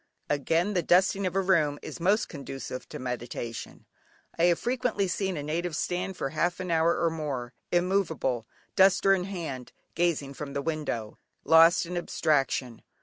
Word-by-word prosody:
Again, 165 +7 +1
the 180 - +2
dusting 190 +3 +3
of 180 - -4
a 195 - +3
room 160 -6 +2
is - - -7
most 200 +6 +2
conducive 135 -3 -7
to - - -6
meditation. 120 -2 -6 0.5
I 165 - +3
have 175 -1 +4
frequently 245 -5 0
seen 190 0 -2
a 145 - -4
native 165 +2 -2
stand 185 +2 -2
for 135 - -2
half 175 +4 -1
an 185 -2 -3
hour 165 +1 +3
or 165 -1 +1
more, 140 -6 -4 0.2
immovable, 175 - 0 0.3
duster 195 0 +5
in 180 -2 0
hand, 160 -10 -6 0.2
gazing 160 -5 0
from 140 0 -7
the 140 0 -2
window, 140 -9 -3 0.2
lost 165 +3 +6
in 175 +1 -4
abstraction. 135 -7 0
165 Hz, 160 wpm, -28 LUFS, 140-185 Hz, 0.5 s, lost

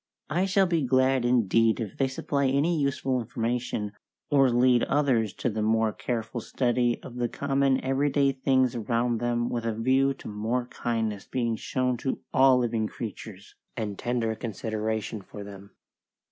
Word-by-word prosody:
I 175 +5 +2
shall 195 0 +3
be 170 -3 +1
glad 130 -1 +2
indeed 115 -2 +3
if 110 -5 -4
they 135 - +1
supply 140 +1 -1
any 140 +6 +2
useful 135 -3 0
information, 115 -2 -2 0.4
or 135 -2 +5
lead 120 0 +4
others 125 -8 +1
to - - -2
the 110 +1 -3
more 110 0 +2
careful 115 0 -3
study 120 0 0
of 125 - -9
the 120 -1 0
common 135 0 +1
every 135 +2 +1
day 140 0 +3
things 130 -2 +2
around 115 +1 0
them 120 0 0
with 120 -1 -2
a 115 -1 -1
view 130 +4 +2
to - - -11
more 110 +4 -2
kindness 110 -5 -3
being 120 -3 -1
shown 125 +2 -1
to 130 +2 -2 0.2
all 130 -1 +6
living 115 -3 0
creatures, 105 -3 -8 0.2
and 105 -4 -4
tender 120 -2 -1
consideration 110 -1 -3
for 100 +2 -10
them. 100 0 -11
120 Hz, 160 wpm, -27 LUFS, 110-130 Hz, 0.4 s, all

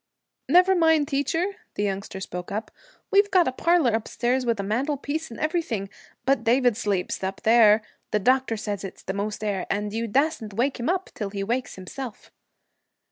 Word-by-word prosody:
'Never 365 +2 +6
mind, 320 -4 +4
teacher,' 330 +8 -1 0.2
the 205 - -1
youngster 195 -1 -3
spoke 180 -1 -6
up, 215 +3 -4 0.4
'we 400 - +7
got 365 -3 +5
a - - +1
parlor 335 -1 +3
upstairs, 240 +3 -1
with 230 -3 +1
a - - -1
mantelpiece 285 +8 -2
and 230 - -9
everything, 310 - -1 0.4
but 275 0 +2
David 245 0 +3
sleeps 200 -3 -2
up 190 +1 -3
there 220 -1 +6 0.3
the - - +1
doctor 255 +2 +2
said 205 -2 -4
it's 195 - -8
the 190 - -3
most 210 +2 -3
air 200 -3 -2
and 205 0 -2
you 230 +1 -2
dassn't 265 -3 0
wake 260 +4 0
him 240 - -1
up 375 +1 -1
till 205 -3 -4
he 195 0 -4
wakes 245 +5 -2
himself.' 215 +5 -8
235 Hz, 180 wpm, -25 LUFS, 205-285 Hz, 0.4 s, we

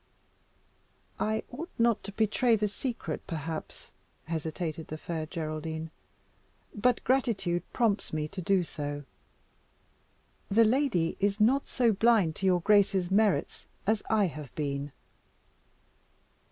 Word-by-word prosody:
"I 220 +1 0
ought 320 +8 -6
not 235 -2 +2
to 200 - -6
betray 220 +3 +2
the 210 -1 +1
secret, 210 - -4
perhaps," 160 -1 -5 0.3
hesitated 160 0 -4
the 155 - -5
Fair 160 -1 -4
Geraldine, 160 0 -4 0.8
"but 245 +3 +1
gratitude 210 -9 +1
prompts 220 -5 +1
me 155 -1 -1
to 190 +2 -6
do 185 +1 +2
so. 145 -3 -5 1.5
The 225 +3 +5
lady 220 - +1
is 200 +1 +1
not 255 +6 +3
so 235 -3 +2
blind 205 -6 +3
to 195 - 0
your 180 -2 +3
grace's 195 -2 +3
merits 205 0 +1 0.2
as 215 +1 +2
I 215 -2 +4
have 150 -6 -6
been." 140 -1 -2
195 Hz, 120 wpm, -29 LUFS, 160-220 Hz, 1.5 s, The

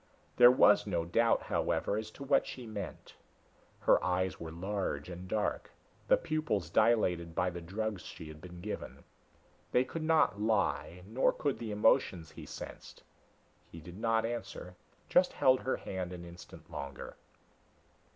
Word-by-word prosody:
There 120 0 +10
was 105 -5 +5
no 85 -4 0
doubt, 115 +7 +2
however, - - 0
as 110 0 -3
to - - -7
what 140 - +3
she 125 - -7
meant. 105 -5 -7 0.7
Her - - +4
eyes 90 0 0
were 80 - -6
large 90 -4 -3
and 90 +1 -8
dark, 105 +2 -1 0.4
the - - +6
pupils 130 - -2
dilated 90 -8 +2
by 90 0 +1
the 85 0 -7
drugs 100 +3 -3
she 80 - -9
had 75 0 -11
been 90 -1 -10
given. 105 +3 -6 0.7
They 125 - +4
could 155 +5 -6
not 155 -10 +3
lie, 100 -4 0
nor 115 +6 +2
could 145 -3 -2
the 115 - -5
emotions 95 -5 +2
he - - -10
sensed. - - -9 0.7
He 85 - -9
did 85 +4 -11
not 115 0 +2
answer, 100 -5 -5 0.3
just - - +4
held 130 -1 +4
her 130 - -1
hand 90 -1 -5
an 85 -1 -8
instant 85 0 -13
longer. 70 -2 -7
100 Hz, 155 wpm, -32 LUFS, 85-115 Hz, 0.7 s, There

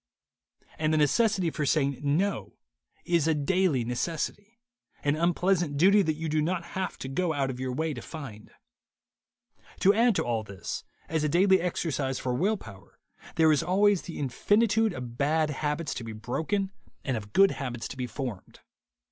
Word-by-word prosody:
And 155 0 +1
the 155 - +2
necessity 185 - +2
for 150 - -3
saying 140 -2 +1
No 165 +8 0 0.5
is 170 -3 +2
a 160 - +3
daily 150 -3 +1
necessity, 170 - -3 0.5
an 145 0 +2
unpleasant 170 -1 +1
duty 195 +6 +6
that 160 -5 0
you 160 +1 -4
do 155 0 +1
not 170 +2 -1
have 190 0 -3
to - - -6
go 160 +5 0
out 135 -2 0
of 125 - -8
your 130 0 -2
way 155 +4 -1
to 120 - -7
find. 125 -10 -9 1.3
To 200 - +6
add 230 0 +3
to - - +1
all 115 -2 -1
this, 100 -2 -6 0.2
as 160 -1 -1
a 150 - +1
daily 190 +4 +4
exercise 145 -6 -1
for 125 - -2
will 195 - +1
power, 100 - -14 0.4
there 160 -1 +5
is 150 - +3
always 195 +3 +3
the 170 - -8
infinitude 210 - +2
of 125 -5 -7
bad 155 +2 +2
habits 150 +2 -2
to 120 - -6
be 115 -1 -6
broken 160 - -2 0.3
and 130 - 0
of 105 -2 -6
good 195 - +5
habits 125 -4 -4
to - - -7
be 125 -1 -3
formed. 120 -4 -6
155 Hz, 175 wpm, -28 LUFS, 130-185 Hz, 1.3 s, duty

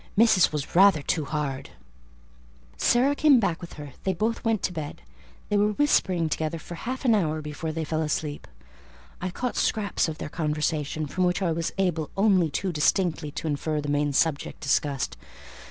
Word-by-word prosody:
Missis 220 -5 +5
was 150 0 -4
rather 185 -5 +6
too 155 0 -1
hard." 140 -3 -3 1.1
Sarah 245 - +3
came 290 -4 +5
back 175 -6 -1
with 170 - -9
her; 145 -3 -9
they 190 - +1
both 220 +6 -1
went 225 -3 0
to 180 - -1
bed; 155 -3 -6 0.5
they 205 - +2
were 210 +1 +2
whispering 185 - +2
together 155 +1 -2
for 165 - -9
half 255 - -5
an 235 - +5
hour 160 -7 +1
before 150 +1 -5
they 160 +1 -3
fell 155 +1 -1
asleep. 150 -1 -3 0.7
I 185 - -2
caught 245 +7 -3
scraps 205 -5 0
of 155 - -6
their - - -5
conversation, 150 -1 -2
from 185 +5 -1
which 180 +2 0
I 175 - +1
was 165 0 -2
able 170 -5 0
only 195 -5 +4
too 185 +6 -2
distinctly 165 0 +1
to 155 - -5
infer 155 +1 -1
the 145 0 -4
main 145 0 +1
subject 145 +1 0
discussed. 140 -1 0
165 Hz, 180 wpm, -26 LUFS, 150-195 Hz, 1.1 s, rather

